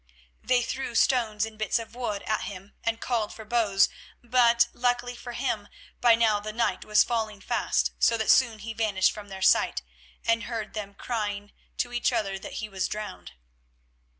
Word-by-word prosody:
They 245 Hz, -1 st, +3 dB
threw 260 Hz, -1 st, -4 dB
stones 225 Hz, -4 st, +2 dB
and 220 Hz, -1 st, -11 dB
bits 215 Hz, +1 st, +1 dB
of 230 Hz, 0 st, -7 dB
wood 225 Hz, -5 st, -3 dB
at 215 Hz, -, -1 dB
him, 195 Hz, 0 st, -9 dB
and 230 Hz, 0 st, -1 dB
called 230 Hz, -4 st, -1 dB
for 220 Hz, -, -10 dB
bows 210 Hz, -4 st, +3 dB, 0.4 s
but, 235 Hz, -1 st, +4 dB
luckily 245 Hz, 0 st, 0 dB
for 240 Hz, 0 st, -8 dB
him, 230 Hz, -5 st, -2 dB, 0.3 s
by 235 Hz, -2 st, +6 dB
now 220 Hz, -2 st, +3 dB
the 215 Hz, +1 st, -5 dB
night 230 Hz, +2 st, 0 dB
was 210 Hz, 0 st, +5 dB
falling 220 Hz, -4 st, -2 dB
fast, -, -, 0 dB
so 230 Hz, -, +4 dB
that 220 Hz, -, +3 dB
soon 235 Hz, -4 st, +4 dB
he 225 Hz, +2 st, -6 dB
vanished 210 Hz, -4 st, +2 dB
from 205 Hz, -1 st, -10 dB
their 190 Hz, -1 st, -6 dB
sight, -, -, +3 dB, 0.4 s
and 230 Hz, 0 st, +2 dB
heard 225 Hz, -3 st, -4 dB
them 200 Hz, -2 st, -6 dB
crying 205 Hz, -3 st, -3 dB, 0.3 s
to 245 Hz, -, -2 dB
each 240 Hz, -, +1 dB
other 200 Hz, -5 st, -1 dB
that -, -, -8 dB
he 220 Hz, -, -4 dB
was 190 Hz, -2 st, -2 dB
drowned. 90 Hz, -, -6 dB
220 Hz, 180 wpm, -27 LUFS, 205-235 Hz, 0.4 s, by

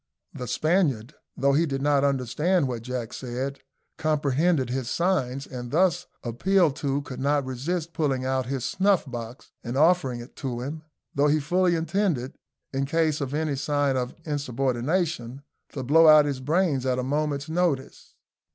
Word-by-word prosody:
The 125 Hz, -, -6 dB
Spaniard, 150 Hz, -, +1 dB, 0.2 s
though 140 Hz, 0 st, +3 dB
he 165 Hz, +4 st, +3 dB
did 135 Hz, -1 st, -3 dB
not 145 Hz, -1 st, +3 dB
understand 140 Hz, +5 st, +1 dB
what 120 Hz, -3 st, -4 dB
Jack 125 Hz, -1 st, -5 dB
said, 130 Hz, +2 st, -4 dB, 0.4 s
comprehended 150 Hz, -2 st, +1 dB
his 130 Hz, -2 st, -2 dB
signs; 140 Hz, -7 st, 0 dB
and, 125 Hz, -2 st, -7 dB
thus 175 Hz, +3 st, +2 dB, 0.2 s
appealed 160 Hz, +6 st, +2 dB
to, 140 Hz, 0 st, -1 dB
could 130 Hz, -2 st, -8 dB
not 140 Hz, +1 st, +1 dB
resist 155 Hz, +6 st, -3 dB
pulling 135 Hz, -5 st, 0 dB
out 130 Hz, -1 st, 0 dB
his 130 Hz, -2 st, -2 dB
snuff 190 Hz, +6 st, +2 dB
box 120 Hz, -2 st, -8 dB
and 120 Hz, +3 st, -3 dB
offering 150 Hz, -6 st, +3 dB
it 120 Hz, +2 st, -11 dB
to 125 Hz, -3 st, -4 dB
him, 150 Hz, +5 st, -5 dB, 0.3 s
though 145 Hz, +1 st, +3 dB
he 150 Hz, +1 st, +3 dB
fully 175 Hz, +4 st, +2 dB
intended, 165 Hz, -5 st, -1 dB, 0.4 s
in 135 Hz, 0 st, -1 dB
case 155 Hz, 0 st, +1 dB
of 140 Hz, 0 st, -3 dB
any 155 Hz, -2 st, 0 dB
sign 145 Hz, 0 st, 0 dB
of 125 Hz, -1 st, -2 dB
insubordination, 135 Hz, 0 st, -1 dB, 0.3 s
to 135 Hz, -, -4 dB
blow 160 Hz, +5 st, +6 dB
out 155 Hz, -1 st, +8 dB
his 140 Hz, -3 st, -2 dB
brains 150 Hz, -1 st, +1 dB
at 130 Hz, -1 st, 0 dB
a 125 Hz, -, -1 dB
moment's 145 Hz, +1 st, -1 dB
notice. 160 Hz, -5 st, -2 dB
140 Hz, 160 wpm, -26 LUFS, 130-160 Hz, 0.4 s, out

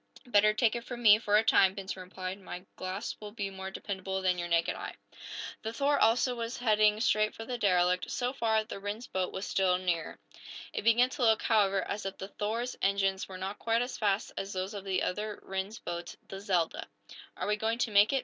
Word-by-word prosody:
"Better 215 Hz, -3 st, +5 dB
take 220 Hz, +1 st, +2 dB
it 235 Hz, -, -4 dB
from 240 Hz, 0 st, -7 dB
me 210 Hz, -1 st, +8 dB
for 210 Hz, -2 st, +3 dB
a 215 Hz, -, +4 dB
time," 195 Hz, -3 st, +5 dB
Benson 190 Hz, -1 st, -5 dB
replied. 185 Hz, +1 st, -6 dB
"My 185 Hz, -1 st, -8 dB
glass 185 Hz, +4 st, -4 dB
will 210 Hz, -, -7 dB
be 200 Hz, -2 st, -4 dB
more 190 Hz, 0 st, -6 dB
dependable 190 Hz, -1 st, -4 dB
than 180 Hz, -1 st, +2 dB
your 175 Hz, -, -2 dB
naked 170 Hz, -1 st, +1 dB
eye." -, -, -6 dB, 0.7 s
The 220 Hz, -, -3 dB
"Thor," 285 Hz, +3 st, +2 dB
also, 240 Hz, +3 st, +3 dB
was 235 Hz, 0 st, -4 dB
heading 215 Hz, -2 st, +3 dB
straight 215 Hz, -2 st, +2 dB
for 225 Hz, -, -7 dB
the 245 Hz, 0 st, -4 dB
derelict. 180 Hz, -3 st, +2 dB
So 250 Hz, 0 st, -1 dB
far, 220 Hz, -4 st, +1 dB
the 215 Hz, -2 st, -7 dB
Rhinds 205 Hz, +4 st, -4 dB
boat 185 Hz, -1 st, -2 dB
was 190 Hz, -, -4 dB
still 185 Hz, -2 st, +2 dB
nearer. 175 Hz, -3 st, -2 dB, 0.6 s
It -, -, -2 dB
began 240 Hz, +3 st, +4 dB
to 290 Hz, -, -6 dB
look, 225 Hz, -2 st, +4 dB
however, 200 Hz, -3 st, +3 dB
as 200 Hz, -1 st, -3 dB
if 195 Hz, -, -6 dB
the 195 Hz, -, -7 dB
"Thor's" 230 Hz, +5 st, -3 dB
engines 195 Hz, -1 st, +1 dB
were 185 Hz, -, -7 dB
not 190 Hz, +2 st, -5 dB
quite 230 Hz, +1 st, +1 dB
as 250 Hz, -, -6 dB
fast 205 Hz, -1 st, +1 dB
as 195 Hz, +1 st, -5 dB
those 190 Hz, +2 st, -3 dB
of 200 Hz, -1 st, -7 dB
the 190 Hz, -2 st, 0 dB
other 210 Hz, +3 st, -2 dB
Rhinds 190 Hz, +3 st, -4 dB
boat, 175 Hz, 0 st, -6 dB
the 195 Hz, -, -7 dB
"Zelda." 180 Hz, -5 st, 0 dB, 0.5 s
"Are -, -, -3 dB
we 210 Hz, -, +2 dB
going 220 Hz, +2 st, -1 dB
to 230 Hz, -2 st, 0 dB
make 205 Hz, +1 st, +6 dB
it?" 270 Hz, -, +2 dB
205 Hz, 220 wpm, -30 LUFS, 190-225 Hz, 0.7 s, me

